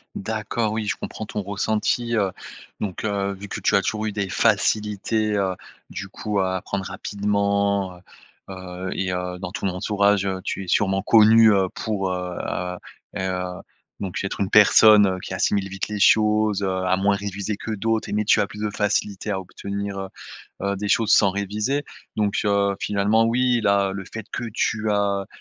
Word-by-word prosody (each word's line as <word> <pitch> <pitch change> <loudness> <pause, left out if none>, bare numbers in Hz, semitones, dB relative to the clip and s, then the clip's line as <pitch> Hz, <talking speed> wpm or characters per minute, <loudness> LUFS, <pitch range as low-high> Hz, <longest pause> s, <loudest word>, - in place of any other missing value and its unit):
D'accord, 110 +1 -2
oui 110 -1 -2
je - - 0
comprends 110 - -6
ton 105 - -4
ressenti, 110 +4 -1
heu, 100 -3 +2 0.5
donc 95 -4 -4
heu, 100 -2 -1
vu 100 +1 -9
que - - -5
tu - - +2
as 100 - +4
toujours 110 +2 -2
eu 110 - -1
des 100 -2 -3
facilités, 105 +1 +1
heu, 95 -2 0 0.3
du - - -6
coup 105 -2 -3
à 95 -1 0
apprendre 95 +1 -4
rapidement, 100 0 -1
heu, - - -16 0.5
heu, 95 0 -7
et 95 -1 -2
heu, 90 0 -4
dans 90 -1 -5
ton 100 - -3
entourage, 100 +1 +1
heu, 95 -1 -2
tu 95 - -4
es - - -15
sûrement 95 +1 +2
connu, 110 +1 +6
heu, 95 -2 +3
pour, 100 -4 -2
heu, 90 -1 -4
heu, 90 0 -3 0.4
heu, 90 -1 -3 0.4
donc 95 -1 -4
être 100 - -4
une 100 -1 -1
personne, 105 0 +7
heu, 95 -1 -1
qui 95 - -7
assimile 100 0 +1
vite 95 0 -4
les 105 -1 -4
choses, 105 0 +4
heu, 95 - 0 0.2
à 90 0 +3
moins 100 +1 +2
réviser 100 +1 -4
que 110 - -6
d'autres 110 +1 -1
et - - -4
mais 105 +1 +1
tu 105 - +4
as - - +3
plus 105 +1 -11
de 105 - 0
facilité 105 0 -1
à 95 - -1
obtenir, 100 +1 -5
heu, 95 0 -5 0.5
heu, 100 0 0
des 105 +1 -3
choses 110 +1 +3
sans 100 -3 +4
réviser, 105 +8 -2 0.3
donc 105 -2 0
heu, 100 -1 +2
finalement 105 +3 +2
oui 125 +1 +2
là, 100 -2 +2
le 95 0 -6
fait 110 -1 -6
que 120 - -3
tu 110 -2 0
as, 100 -1 0
100 Hz, 190 wpm, -23 LUFS, 95-105 Hz, 0.5 s, personne